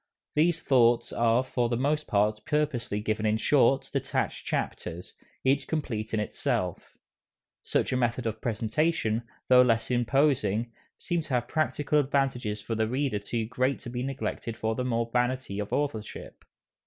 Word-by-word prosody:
These 165 +2 +2
thoughts 120 -3 +3
are 115 +2 +3
for 125 -2 -1
the 120 - 0
most 150 +4 0
part 105 +1 +1
purposely 145 -9 0
given 110 0 -1
in 110 0 +2
short, 135 +2 +3
detached - - -2
chapters, 90 0 -3 0.3
each 135 0 +2
complete 115 -9 -3
in 110 - 0
itself. 90 -3 -2 0.6
Such - - 0
a - - +2
method 120 0 0
of 110 -1 -3
presentation, 115 +1 0 0.3
though 125 0 +7
less 115 -1 +2
imposing, 120 -3 +2 0.3
seemed 170 -2 -2
to 135 - -1
have 120 -1 0
practical 150 -1 +1
advantages 135 -6 0
for 110 +2 -4
the 110 0 +1
reader 130 -2 0
too 110 +2 -2
great 130 +3 0
to 120 - -7
be 125 0 -3
neglected 130 -3 -4
for 110 0 -1
the 125 - -2
mere 115 -2 0
vanity 125 -3 -1
of 105 - -4
authorship. 115 -8 -4
120 Hz, 155 wpm, -28 LUFS, 110-135 Hz, 0.6 s, though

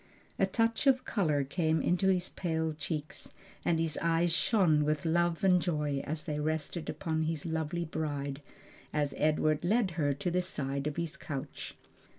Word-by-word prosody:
A - - +4
touch 230 +4 +1
of 260 -1 +4
color 155 -9 +1
came 160 +3 +1
into 180 +2 +2
his 185 -1 +2
pale 160 -3 -1
cheeks, 150 0 -5 0.3
and 165 -2 +2
his 160 -2 -1
eyes 165 0 +2
shone 175 -5 +3
with 150 0 0
love 170 +1 +1
and 180 -2 +5
joy 150 -5 0
as 155 +1 -3
they 150 -2 -3
rested 155 +2 -2
upon 160 -1 -2
his 160 -2 -2
lovely 160 +1 -2
bride, 145 -3 -3 0.5
as 145 -2 0
Edward 155 0 +2
led 205 +1 +2
her 145 -4 0
to 145 +5 -2
the 180 +1 +2
side 140 -5 -2
of 150 - -2
his 170 -1 -2
couch. 140 -2 -6
160 Hz, 165 wpm, -31 LUFS, 150-175 Hz, 0.5 s, and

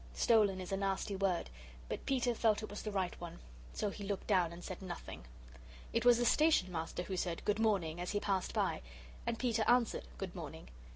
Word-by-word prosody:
'Stolen' 210 -5 +4
is 185 0 -6
a 195 - +1
nasty 195 +1 -1
word, 190 -3 +1 0.4
but - - -5
Peter 250 -2 +2
felt 220 -1 +2
it 215 - -6
was 205 - -5
the 215 - -3
right 190 -4 -2
one. 170 -1 -6 0.3
So 210 - -1
he 200 - -7
looked 200 -1 -3
down, 180 -5 +3
and 170 +1 -9
said 185 - -6
Nothing. 175 - -7 0.7
It 230 +1 +1
was 245 -1 +8
the 240 - +1
Station 300 - +4
Master 165 +1 -3
who 190 +1 -4
said 175 -2 -2
"Good 210 +1 +1
morning" 180 -7 +1
as 180 - -3
he 205 - 0
passed 195 -3 0
by. - - 0 0.5
And 235 - 0
Peter 230 -3 +1
answered, 240 - +3
"Good - - -4
morning." 60 - -8
195 Hz, 210 wpm, -35 LUFS, 180-225 Hz, 0.7 s, was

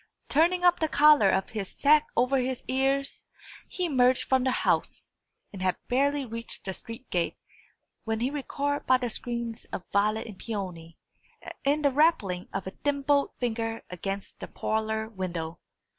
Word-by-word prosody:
Turning 345 +5 +3
up 355 0 +5
the 315 - +2
collar 295 -8 +6
of 190 0 +1
his 205 -4 -4
sack 300 +1 +4
over 255 +3 +3
his 255 0 -2
ears, 270 +1 0 0.4
he 365 - -2
emerged 255 -5 +3
from 260 -1 +2
the 260 - +2
house, - - 0 0.4
and 195 - -7
had 185 -1 +1
barely 280 +2 +2
reached 230 0 -7
the 190 - -2
street 230 +6 -8
gate 175 -2 0 0.7
when 225 -1 -2
he 250 +4 0
was 295 - -2
recalled 285 +1 -2
by 255 - +6
the 245 -2 -2
screams 235 0 -4
of 180 - -6
Violet 210 +2 +2
and 210 -4 -10
Peony, 180 -7 -6 0.7
and 290 +2 +1
the 285 - +5
rapping 255 - +2
of 195 - -3
a 190 - -5
thimbled 280 +2 +1
finger 225 -2 -2
against 195 +2 -5
the - - -6
parlour 220 0 -2
window. 175 -5 -5
245 Hz, 165 wpm, -28 LUFS, 200-280 Hz, 0.7 s, collar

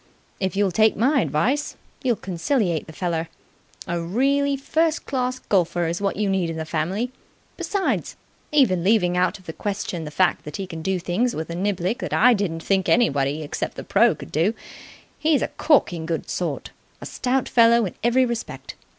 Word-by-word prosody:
If 190 0 -1
you'll 200 -1 +2
take 215 +4 +3
my 270 +6 +3
advice, 255 - 0 0.3
you'll 250 -4 +1
conciliate 185 - -1
the - - -9
feller. 165 -1 -2 0.6
A 170 0 -2
really 275 +10 +1
first 320 +4 0
class 255 -2 -1
golfer 175 -6 0
is 170 +3 -2
what 200 -1 0
you 210 0 0
need 190 -3 0
in 165 - -4
the 160 - -3
family. 175 +10 -2 0.4
Besides, 395 -2 -1 0.4
even 210 - +3
leaving 185 -3 +3
out 180 +1 +1
of 190 - -20
the 160 - -6
question 195 -4 -3
the 150 - -6
fact 180 +4 +1
that 150 - -6
he 195 - -4
can 165 -3 -7
do 190 +3 0
things 180 +8 -1
with 160 +1 -4
a - - -4
niblick 190 +3 -1
that - - -4
I 245 +3 +6
didn't 175 -6 -2
think 190 -2 +1
anybody 145 - +2
except 145 - -4
the - - -6
pro. - - +3
could - - -11
do, 175 +9 +1 0.6
he's 305 -2 +2
a - - -2
corking 175 - +2
good 165 -1 -3
sort. - - -3 0.3
A - - -9
stout 260 +1 -1
fellow 235 -1 +5
in 185 - -5
every 245 +2 +4
respect. 235 -2 -5
195 Hz, 185 wpm, -23 LUFS, 170-245 Hz, 0.6 s, I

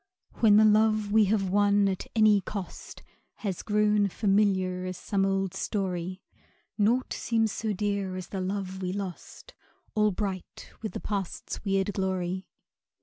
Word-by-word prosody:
When 210 -3 +6
the 215 - +7
love 215 -1 +3
we 215 0 +5
have 195 -2 +1
won 205 0 +4
at 190 -1 -3
any 215 -2 +5
cost 195 -1 -7 0.3
Has 195 -5 -4
grown 210 -1 +2
familiar 195 -2 +1
as 185 -1 -5
some 195 -1 0
old 195 -1 0
story, 185 -2 -3 0.5
Naught 230 +5 +1
seems 225 -2 0
so 220 +1 -2
dear 200 -2 -1
as 185 -1 -6
the 195 - -3
love 190 0 -3
we 180 -1 -2
lost, 200 - -7 0.4
All 210 0 +3
bright 190 -2 -5
with 220 - -4
the - - -4
Past's 200 -4 -4
weird 195 0 0
glory. 185 -1 -2
200 Hz, 145 wpm, -28 LUFS, 190-210 Hz, 0.5 s, the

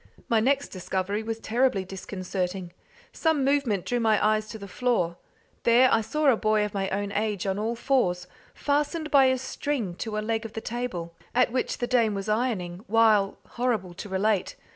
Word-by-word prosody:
My 230 - +3
next 275 +5 +1
discovery 190 +2 -2
was 225 0 -3
terribly 225 -3 +1
disconcerting. 185 -1 -4 0.4
Some 315 -5 +1
movement 270 -9 +1
drew 245 - 0
my 220 -2 +3
eyes 215 0 +1
to 220 - -6
the 200 -2 -9
floor; 185 -6 0 0.4
there 245 +2 +5
I 225 - +4
saw 300 +8 -2
a - - +3
boy 215 -1 +2
of 210 - -6
my 195 -1 -1
own 200 +1 -2
age 210 -2 -1
on 195 0 -1
all 225 +2 -1
fours, 205 -9 +1 0.3
fastened 300 +2 -1
by 275 -2 +7
a 260 0 +3
string 260 -5 -3
to 220 -2 -4
a 215 - -2
leg 225 0 -1
of 225 -1 -8
the - - -3
table 220 -8 -4 0.2
at 250 -1 +4
which 255 0 -1
the 245 - -1
dame 235 -4 +2
was 195 +1 -4
ironing, 210 -6 -1
while 215 -3 +4
horrible 225 -7 -2
to 195 +4 -8
relate! 195 +1 0
220 Hz, 185 wpm, -26 LUFS, 195-245 Hz, 0.4 s, by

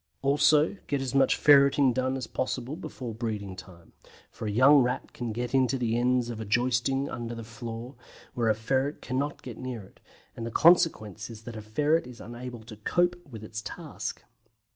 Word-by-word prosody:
Also 145 +5 +4
get 140 - 0
as 135 -1 -3
much 135 -1 +4
ferreting 140 -2 +5
done 130 +1 0
as 130 - -4
possible 130 +2 -3
before 130 -8 -7
breeding 105 -4 -4
time, 85 -2 -13 0.4
for 110 - -6
a - - -1
young 135 +7 +7
Rat 125 0 -2
can 120 -2 -4
get 120 +3 -4
into 135 0 +3
the 115 -2 0
ends 125 0 +1
of 115 - -6
the - - -3
joisting 125 +5 +1
under 120 -2 -5
a - - -6
floor, 115 +2 -7 0.4
where 115 -2 +1
a 110 - +3
ferret 130 +6 -1
cannot 140 +3 -2
get 125 -3 -8
near 125 -4 -5
it, 95 - -19 0.4
and 115 - -6
the 115 - -3
consequence 115 - +3
is 115 -1 -10
that 120 0 -8
a 110 - -6
ferret 145 +8 +1
is 125 -1 -11
unable 120 -1 -8
to 110 -1 -11
cope 175 +11 +1
with 110 -4 -9
its 110 0 -6
task. 110 - -6
125 Hz, 190 wpm, -28 LUFS, 115-135 Hz, 0.4 s, young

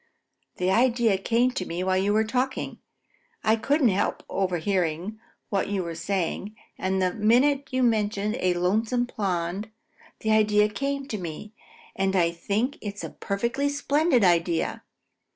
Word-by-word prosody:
The 180 +1 +1
idea 235 -1 +3
came 235 +5 +2
to 195 - -3
me 175 0 -4
while 185 0 +1
you 195 +2 +2
were 215 +1 +3
talking. 255 +4 -2 0.6
I 220 0 +4
couldn't 270 +3 +2
help 195 0 0
overhearing 185 +1 -1 0.3
what 195 -2 0
you 195 -2 -1
were 170 -1 -5
saying, 190 +4 -2 0.2
and 190 0 -1
the 185 -1 +1
minute 265 +6 +3
you 255 0 0
mentioned 215 -2 +1
a 180 -1 +1
lonesome 220 +7 +1
pond, 195 -3 -2 0.5
the 220 - 0
idea 210 -1 +4
came 275 +4 -3
to 215 - -3
me, 180 +5 -7 0.4
and 195 0 0
I 170 -2 +3
think 205 +10 -2
it's 205 -1 -6
a - - -5
perfectly 235 +8 -1
splendid 285 -2 +2
idea. 170 -2 +2
210 Hz, 150 wpm, -26 LUFS, 185-240 Hz, 0.6 s, I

